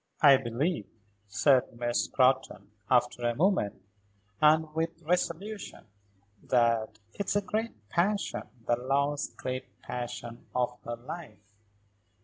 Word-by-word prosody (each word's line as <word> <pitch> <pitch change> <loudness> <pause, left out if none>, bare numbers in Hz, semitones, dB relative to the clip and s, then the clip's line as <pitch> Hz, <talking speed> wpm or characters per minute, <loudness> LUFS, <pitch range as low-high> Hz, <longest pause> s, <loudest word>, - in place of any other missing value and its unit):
"I 140 -3 +9
believe," 130 - -1 0.4
said 120 +5 +3
Miss 120 0 0
Scrotton, 130 -4 +1 0.2
after 125 -1 +3
a 120 -1 +1
moment, 150 - +1 0.6
and 155 0 +5
with 165 +1 -2
resolution, 180 +5 -2 0.6
"that 115 -3 +2 0.2
it's 200 0 -2
a 205 - +3
great 210 - -3
passion; 200 +4 0 0.2
the 120 - +2
last 140 +3 0
great 130 0 -5
passion 120 -1 -6
of 125 -1 +1
her 120 - -3
life." 120 - -8
130 Hz, 115 wpm, -29 LUFS, 120-165 Hz, 0.6 s, I